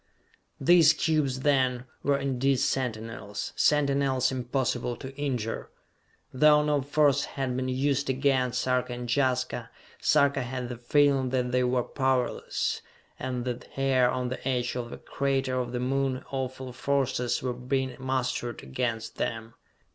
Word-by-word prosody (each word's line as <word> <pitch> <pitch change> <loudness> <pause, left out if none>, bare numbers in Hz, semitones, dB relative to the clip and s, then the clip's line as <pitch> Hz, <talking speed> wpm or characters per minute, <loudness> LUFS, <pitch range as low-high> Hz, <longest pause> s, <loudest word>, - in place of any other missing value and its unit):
These 160 +1 +6
cubes 150 -5 0
then, 130 -3 +2 0.2
were 140 -1 +2
indeed 135 0 +1
sentinels 115 -5 -3
sentinels 140 -3 +2
impossible 125 -1 -1
to 135 +2 -9
injure. 125 -6 -3 0.6
Though 150 +2 +5
no 150 -1 +1
force 145 0 +2
had 130 -2 -3
been 130 0 -1
used 135 +1 0
against 130 -2 +1
Sarka 125 -1 0
and 120 0 -5
Jaska, 130 -3 0 0.3
Sarka 140 -2 +3
had 125 0 -4
the 125 - -5
feeling 135 +1 +3
that 125 -1 0
they 125 0 +2
were 125 0 +1
powerless, 130 -2 -1 0.4
and 125 -1 -3
that 125 -1 -4
here 130 -2 +3
on 125 -1 -1
the 130 +1 -5
edge 125 -2 0
of 120 -1 -4
a - - -6
crater 135 -2 -1
of 120 -1 -3
the 125 - -2
Moon 135 0 -1
awful 130 -1 -4
forces 130 -3 0
were 125 -1 -1
being 130 +1 -2
mustered 130 -2 -2
against 115 - -3
them. 115 0 -3
130 Hz, 140 wpm, -28 LUFS, 125-135 Hz, 0.6 s, These